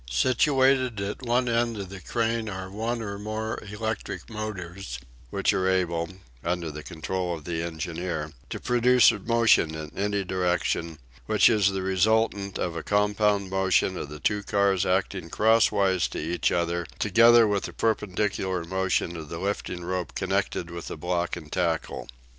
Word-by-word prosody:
Situated 130 - +3
at 100 +1 -4
one 125 0 +1
end 115 -1 +1
of 100 -2 -5
the 95 -1 -9
crane 115 0 -1
are 95 -1 -6
one 115 +3 -2
or 100 -1 -5
more 110 +1 -4
electric 105 -1 -4
motors, 95 -4 -5 0.3
which - - +1
are 95 0 +1
able, 85 -3 0 0.3
under 85 -1 -2
the 75 +1 -7
control 90 +2 -3
of 80 - -10
the 85 -2 -2
engineer, 85 -1 -4 0.2
to - - -4
produce 125 0 +5
a - - -5
motion 115 -7 +3
in 80 -1 -7
any 100 0 0
direction, 90 -3 -1 0.3
which 110 +1 +5
is 105 -3 +4
the 95 -1 -3
resultant 100 +1 +1
of 85 -2 -2
a 85 - -3
compound 105 -1 +1
motion 95 -1 +2
of 75 - -5
the 75 0 -8
two 105 +6 0
cars 100 -2 +1
acting 95 -2 0
crosswise 100 -4 +3
to - - -7
each 85 +3 0
other 85 0 0
together 115 +2 +6
with 100 -1 0
the - - -7
perpendicular 100 -4 -1
motion 95 -1 -1
of 80 -3 -7
the 85 - -5
lifting 90 -1 -3
rope 90 -1 -3
connected 85 -1 -1
with 85 -1 -7
the - - -6
block 90 +2 -1
and 80 -4 -10
tackle. 85 -3 -1
95 Hz, 165 wpm, -26 LUFS, 85-110 Hz, 0.3 s, together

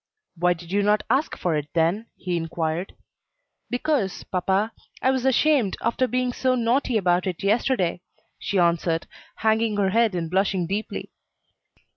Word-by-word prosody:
"Why 180 +1 +2
did 170 +1 -12
you 200 +1 +2
not 210 +1 +2
ask 275 +5 +1
for 170 -3 0
it, 150 -1 -2
then?" 170 +7 +1
he 180 -1 -3
inquired. 165 +1 -2 0.7
"Because, 250 - -1
papa, 195 +4 0 0.3
I 260 - +3
was 260 -1 -1
ashamed, 265 -4 +3
after 235 +3 +1
being 250 0 0
so 255 0 +1
naughty 240 0 +1
about 180 -2 +2
it 180 -1 -4
yesterday," 200 -4 +1 0.4
she 200 - -2
answered, 170 -1 +2 0.3
hanging 220 -1 +1
her 195 -2 +2
head 225 -2 +3
and 170 -2 -2
blushing 190 0 +1
deeply. 200 +5 -4
200 Hz, 150 wpm, -24 LUFS, 175-235 Hz, 0.7 s, I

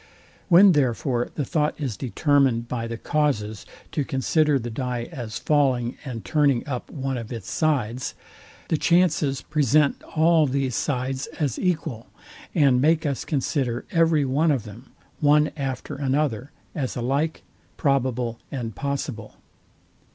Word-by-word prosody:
When 190 +3 +8
therefore 125 -4 +1
the 145 - -1
thought 150 +3 0
is 135 -8 -2
determined 135 -2 +1
by 115 -1 -3
the 115 0 -5
causes 110 -7 -1 0.2
to 145 - 0
consider 150 +1 +2
the 120 -2 -5
dye 125 0 -3
as 120 -8 -5
falling 130 -5 +1
and 125 -6 -6
turning 145 -4 +2
up 125 -4 -4
one 135 -2 -3
of 115 0 -8
its 110 -6 -6
sides, 130 -6 0 0.5
the 160 - +2
chances 155 -6 +2
present 150 -1 +2 0.2
all 160 -1 +5
these 135 -2 -1
sides 130 0 -2
as 145 -7 -1
equal, 155 - -2 0.5
and 135 -6 +4
make 160 +2 +3
us 140 -3 -1
consider 130 -4 -1
every 165 -3 +3
one 145 +5 +2
of 135 -7 +1
them, 110 +4 -12 0.3
one 150 0 +4
after 135 -4 -4
another, 135 -3 -1 0.2
as 135 -6 -3
alike 140 +6 -1 0.3
probable 125 -4 0
and 120 -5 -4
possible. 135 -5 -4
135 Hz, 135 wpm, -24 LUFS, 120-150 Hz, 0.5 s, When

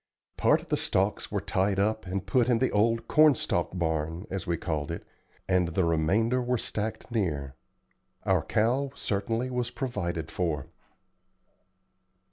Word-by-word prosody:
Part - - +3
of - - -18
the - - +2
stalks - - 0
were - - 0
tied 95 +1 0
up 105 0 0
and 95 +1 -3
put 120 +5 +2
in 120 - +4
the 130 +3 +1
old 115 +2 +2
"corn 155 -2 +6
stalk 95 - -1
barn," 80 +1 -1
as 95 -2 -4
we 85 -1 0
called 80 -3 -2
it, 85 - -5 0.4
and 90 -2 +3
the 85 +2 +1
remainder 95 +10 +2
were 125 0 0
stacked 110 +2 -3
near. 75 - -1 0.7
Our - - +3
cow 125 +6 +1
certainly 115 +5 -1
was 125 -1 -1
provided 85 - -3
for. 80 -5 -1
100 Hz, 150 wpm, -28 LUFS, 85-115 Hz, 0.7 s, corn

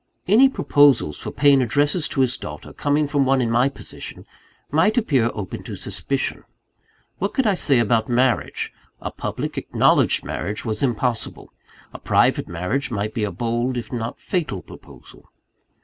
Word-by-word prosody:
Any 235 +8 +6
proposals 145 - +3
for - - -5
paying 140 -1 +4
addresses 145 - +1
to 135 - -1
his 125 -1 +2
daughter, - - -8
coming 145 +1 +1
from 145 -1 +1
one 135 0 +2
in 120 -2 0
my 120 +4 +3
position, 135 - -9 0.5
might 165 - +3
appear 135 - +2
open 100 -3 -5
to - - -6
suspicion. - - -3 0.8
What 200 +2 -2
could 265 - +2
I 210 - +4
say 145 -7 +2
about 115 0 +2
marriage? 125 +1 0 0.3
A - - -5
public, - - -4
acknowledged - - +2
marriage 105 +1 -4
was 110 -2 -2
impossible: 120 -2 -2 0.4
a - - -8
private - - +2
marriage 90 - -2
might 105 -2 -3
be 110 - -2
a 105 - -1
bold, 120 +6 -1
if 120 - -6
not 115 -1 -4
fatal 150 - -3
proposal. - - -15
130 Hz, 160 wpm, -22 LUFS, 115-145 Hz, 0.8 s, Any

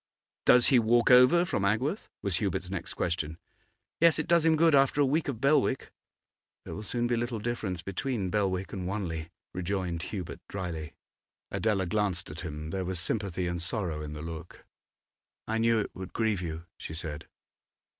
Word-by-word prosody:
'Does 125 -1 +7
he 130 -4 +6
walk 120 +2 +4
over 125 +8 +7
from 175 - -1
Agworth?' 125 - 0
was 95 -4 0
Hubert's 90 -2 -2
next 90 -4 -4
question. 80 -2 -2 0.6
'Yes. 165 -1 +5
It 155 - -1
does 170 -1 +4
him 160 -1 +5
good 165 0 +4
after 135 +1 +4
a 145 - +6
week 150 +4 +1
of 130 -6 -3
Belwick.' 135 0 +2 0.7
'There - - -6
will 105 - -5
soon 120 +3 -2
be 120 0 +1
little 120 0 -2
difference 105 -6 -3
between 100 0 -2
Belwick 95 -3 0
and 90 -2 -3
Wanley,' 85 -5 -3 0.2
rejoined 90 -2 -2
Hubert, 95 -1 -5
drily. 85 -5 -5 0.6
Adela 105 -4 +1
glanced 90 -3 -1
at 75 - -8
him; 75 -2 -6
there 95 +1 -2
was 90 -1 -2
sympathy 95 -1 -1
and 85 -1 -2
sorrow 90 -5 0
in 75 0 -6
the 75 0 -6
look. 80 +1 -8 0.8
'I 110 - 0
knew 115 0 +3
it - - -5
would 95 0 -8
grieve 110 -4 +1
you,' 80 -1 -5
she 80 - -6
said. 80 -3 -5
100 Hz, 175 wpm, -29 LUFS, 85-120 Hz, 0.8 s, Does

